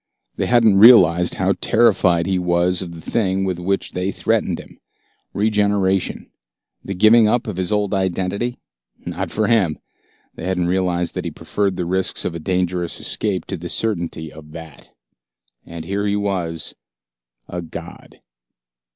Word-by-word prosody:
They -, -, -1 dB
hadn't 115 Hz, -5 st, +4 dB
realized 90 Hz, -7 st, +7 dB
how -, -, +1 dB
terrified 95 Hz, -7 st, +3 dB
he 95 Hz, 0 st, 0 dB
was 90 Hz, +1 st, +1 dB
of 85 Hz, -2 st, -6 dB
the 80 Hz, -, -10 dB
thing 95 Hz, -1 st, 0 dB
with 95 Hz, -2 st, -2 dB
which 95 Hz, +2 st, -2 dB
they 90 Hz, +2 st, -2 dB
threatened -, -, -1 dB
him. -, -, -14 dB, 0.5 s
Regeneration, 100 Hz, -3 st, 0 dB, 0.5 s
the 100 Hz, -, -5 dB
giving 110 Hz, +3 st, +6 dB
up 120 Hz, +4 st, +1 dB
of 105 Hz, -6 st, -5 dB
his 95 Hz, +1 st, -1 dB
old 105 Hz, -1 st, 0 dB
identity? 95 Hz, +5 st, -1 dB, 0.5 s
Not -, -, -4 dB
for 110 Hz, -, -1 dB
him. 100 Hz, -10 st, +2 dB, 0.6 s
They -, -, -8 dB
hadn't 90 Hz, -2 st, 0 dB
realized 90 Hz, -1 st, 0 dB
that -, -, -4 dB
he -, -, -1 dB
preferred 100 Hz, -2 st, -2 dB
the 90 Hz, -, -3 dB
risks 95 Hz, +2 st, -1 dB
of -, -, -2 dB
a 85 Hz, -, -5 dB
dangerous 90 Hz, 0 st, -2 dB
escape 100 Hz, -4 st, -2 dB
to 95 Hz, -, -5 dB
the 85 Hz, +1 st, -7 dB
certainty 85 Hz, -8 st, -2 dB
of 75 Hz, 0 st, -13 dB
that. 80 Hz, -3 st, -11 dB, 0.8 s
And 85 Hz, -1 st, -8 dB
here 100 Hz, +3 st, -2 dB
he 100 Hz, -, +1 dB
was 90 Hz, -6 st, -3 dB, 0.7 s
a 90 Hz, -, -5 dB
god. 85 Hz, -, -10 dB
95 Hz, 155 wpm, -20 LUFS, 85-100 Hz, 0.8 s, realized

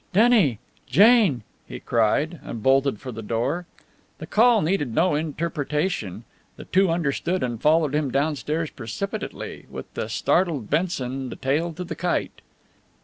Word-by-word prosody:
"Denny! 205 Hz, -, +4 dB, 0.3 s
Jane!" 195 Hz, -, +5 dB, 0.2 s
he -, -, -7 dB
cried, 140 Hz, +9 st, +1 dB
and 115 Hz, -5 st, -7 dB
bolted 135 Hz, -3 st, +3 dB
for 130 Hz, -, -7 dB
the 115 Hz, -1 st, -7 dB
door. 120 Hz, +11 st, -2 dB, 0.5 s
The -, -, -7 dB
call 230 Hz, -1 st, +4 dB
needed 150 Hz, -9 st, -1 dB
no 180 Hz, 0 st, +3 dB
interpretation. 150 Hz, -, -2 dB, 0.3 s
The -, -, -11 dB
two 190 Hz, 0 st, +3 dB
understood, 165 Hz, +2 st, -1 dB
and 120 Hz, -3 st, -3 dB
followed 155 Hz, -2 st, +3 dB
him 150 Hz, -2 st, 0 dB
downstairs 150 Hz, +3 st, -1 dB
precipitately, 195 Hz, -, -6 dB
with -, -, -9 dB
the -, -, -4 dB
startled 160 Hz, -, 0 dB
Benson 135 Hz, -6 st, -1 dB
the -, -, -7 dB
tail 150 Hz, +6 st, -1 dB
to 180 Hz, -, -6 dB
the 175 Hz, -, -5 dB
kite. 180 Hz, 0 st, -2 dB
150 Hz, 145 wpm, -24 LUFS, 130-180 Hz, 0.5 s, Jane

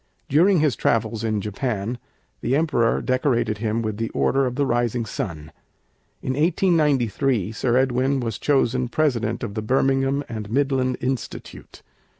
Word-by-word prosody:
During 175 Hz, +4 st, +4 dB
his 150 Hz, -7 st, +2 dB
travels 115 Hz, +1 st, 0 dB
in 110 Hz, -2 st, 0 dB
Japan 110 Hz, +2 st, -3 dB, 0.4 s
the 130 Hz, -, +1 dB
Emperor 150 Hz, -7 st, +1 dB
decorated 120 Hz, -5 st, 0 dB
him 115 Hz, +1 st, -1 dB
with 110 Hz, -2 st, -3 dB
the 115 Hz, 0 st, -2 dB
Order 135 Hz, -1 st, +2 dB
of 125 Hz, -, -4 dB
the 140 Hz, +1 st, +1 dB
Rising 120 Hz, -1 st, 0 dB
Sun. 80 Hz, -6 st, -5 dB, 0.7 s
In -, -, -4 dB
1893 140 Hz, -, +1 dB
Sir 120 Hz, +2 st, 0 dB
Edwin 130 Hz, +1 st, +1 dB
was 115 Hz, -4 st, -3 dB
chosen 130 Hz, -3 st, +1 dB
President 120 Hz, -5 st, 0 dB
of 110 Hz, -4 st, -4 dB
the 110 Hz, -, -3 dB
Birmingham 135 Hz, +4 st, +1 dB
and 110 Hz, -3 st, -6 dB
Midland 130 Hz, 0 st, +1 dB
Institute. 130 Hz, -1 st, -5 dB
125 Hz, 145 wpm, -23 LUFS, 110-135 Hz, 0.7 s, During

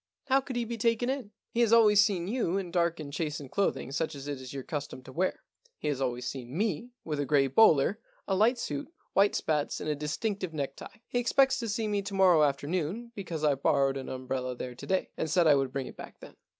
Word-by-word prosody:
How 270 Hz, +1 st, +5 dB
could 260 Hz, -1 st, -7 dB
he 240 Hz, -1 st, 0 dB
be 230 Hz, 0 st, -5 dB
taken 230 Hz, +3 st, +2 dB
in 265 Hz, -6 st, -4 dB
" -, -, -64 dB
* -, -, -64 dB
" -, -, -61 dB
He 235 Hz, -, -1 dB
has 235 Hz, -2 st, +4 dB
always 210 Hz, -3 st, +7 dB
seen 190 Hz, -5 st, 0 dB
you 205 Hz, -5 st, 0 dB
in 185 Hz, -3 st, -4 dB
dark 170 Hz, -1 st, +1 dB
and 140 Hz, -2 st, -7 dB
chastened 150 Hz, -3 st, -3 dB
clothing, 195 Hz, -9 st, 0 dB
such 155 Hz, +2 st, -2 dB
as 140 Hz, 0 st, -8 dB
it 140 Hz, -2 st, -4 dB
is 130 Hz, -, -8 dB
your 135 Hz, -1 st, -5 dB
custom 145 Hz, -4 st, -5 dB
to 130 Hz, -, -11 dB
wear.. 180 Hz, +7 st, -1 dB, 0.3 s
He -, -, -2 dB
has 140 Hz, -2 st, -2 dB
always 125 Hz, -1 st, -1 dB
seen 130 Hz, +2 st, -6 dB
me 215 Hz, +2 st, -1 dB
with 150 Hz, -3 st, -3 dB
a 145 Hz, -, 0 dB
gray 145 Hz, -2 st, +4 dB
bowler, 160 Hz, -, +4 dB, 0.3 s
a 195 Hz, -, 0 dB
light 220 Hz, +6 st, +3 dB
suit, 145 Hz, -, -4 dB, 0.2 s
white 200 Hz, +1 st, +4 dB
spats, 150 Hz, -2 st, 0 dB
and -, -, -5 dB
a 150 Hz, -, +1 dB
dis 150 Hz, +1 st, -3 dB
tinctive 200 Hz, -6 st, -2 dB
necktie. 140 Hz, +7 st, -5 dB
He 245 Hz, -, 0 dB
expects 265 Hz, +2 st, +3 dB
to 230 Hz, -2 st, -3 dB
see 220 Hz, +1 st, -1 dB
me 205 Hz, -1 st, 0 dB
to 200 Hz, 0 st, -6 dB
morrow 185 Hz, -4 st, +6 dB
afternoon, 160 Hz, -, -1 dB
because 175 Hz, -7 st, -5 dB
I 150 Hz, -2 st, +4 dB
borrowed 135 Hz, 0 st, +2 dB
an 135 Hz, -1 st, -5 dB
umbrella 130 Hz, -1 st, -3 dB
there 125 Hz, 0 st, -6 dB
to 120 Hz, -, -10 dB
day, 190 Hz, 0 st, 0 dB
and 160 Hz, -, -2 dB
said 170 Hz, +2 st, +3 dB
I 155 Hz, -, +7 dB
would 135 Hz, -2 st, +1 dB
bring 135 Hz, -1 st, -3 dB
it -, -, -10 dB
back -, -, -10 dB
then. -, -, -13 dB
165 Hz, 255 wpm, -29 LUFS, 140-210 Hz, 0.3 s, always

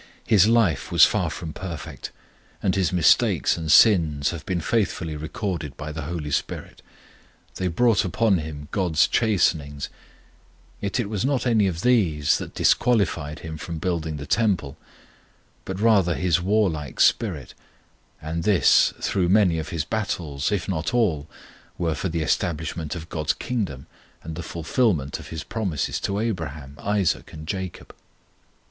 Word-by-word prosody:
His 105 Hz, -3 st, +5 dB
life 110 Hz, -, +2 dB
was -, -, +8 dB
far -, -, 0 dB
from 80 Hz, -2 st, -6 dB
perfect; 85 Hz, -5 st, -7 dB, 0.5 s
and 95 Hz, -, +2 dB
his 95 Hz, -4 st, +1 dB
mistakes 90 Hz, -4 st, +3 dB
and 80 Hz, -2 st, -2 dB
sins 80 Hz, -10 st, +5 dB
have 85 Hz, -2 st, -7 dB
been 90 Hz, -2 st, 0 dB
faithfully 85 Hz, -4 st, -1 dB
recorded 80 Hz, -, -4 dB
by 75 Hz, +1 st, -6 dB
the 80 Hz, +1 st, -5 dB
HOLY 75 Hz, -1 st, -5 dB
SPIRIT. -, -, -3 dB, 0.8 s
They 95 Hz, -, -1 dB
brought 110 Hz, +5 st, +3 dB
upon 95 Hz, +1 st, +2 dB
him 75 Hz, -2 st, -7 dB
GOD'S 85 Hz, -4 st, +2 dB
chastenings, 80 Hz, -10 st, 0 dB, 0.9 s
yet 100 Hz, +4 st, -2 dB
it 120 Hz, -, -1 dB
was 100 Hz, -2 st, -2 dB
not 135 Hz, -1 st, 0 dB
any 110 Hz, -5 st, +3 dB
of 85 Hz, -3 st, -3 dB
these 90 Hz, -, +2 dB
that -, -, -8 dB
disqualified 85 Hz, -10 st, +1 dB
him 80 Hz, -1 st, -7 dB
from 85 Hz, 0 st, -5 dB
building 80 Hz, -2 st, -2 dB
the 70 Hz, -, -7 dB
Temple, 95 Hz, -12 st, 0 dB, 0.9 s
but 95 Hz, 0 st, -5 dB
rather 100 Hz, -6 st, +3 dB
his 90 Hz, -2 st, +1 dB
warlike 90 Hz, -, 0 dB
spirit; -, -, +2 dB, 0.7 s
and 80 Hz, +2 st, -4 dB
this 100 Hz, -1 st, +4 dB, 0.2 s
though 90 Hz, -3 st, +2 dB
many 90 Hz, -4 st, +3 dB
of 80 Hz, -, -5 dB
his 80 Hz, -3 st, -2 dB
battles, 85 Hz, -9 st, -2 dB
if 100 Hz, -4 st, -1 dB
not 90 Hz, +3 st, -2 dB
all, 85 Hz, -12 st, +1 dB, 0.5 s
were 85 Hz, -2 st, 0 dB
for 85 Hz, +5 st, -3 dB
the 80 Hz, -1 st, -1 dB
establishment 80 Hz, 0 st, -2 dB
of 80 Hz, -1 st, -7 dB
GOD'S 75 Hz, -1 st, -1 dB
Kingdom 95 Hz, -, -4 dB, 0.4 s
and 80 Hz, -, -6 dB
the 85 Hz, -, -5 dB
fulfilment 80 Hz, -, -1 dB
of -, -, -10 dB
His 80 Hz, -3 st, -6 dB
promises 95 Hz, -11 st, -2 dB
to 100 Hz, -, -2 dB
Abraham, 75 Hz, -11 st, -4 dB
Isaac, 100 Hz, -4 st, -1 dB
and 80 Hz, 0 st, -9 dB
Jacob. 95 Hz, -2 st, -5 dB
85 Hz, 150 wpm, -24 LUFS, 75-100 Hz, 0.9 s, was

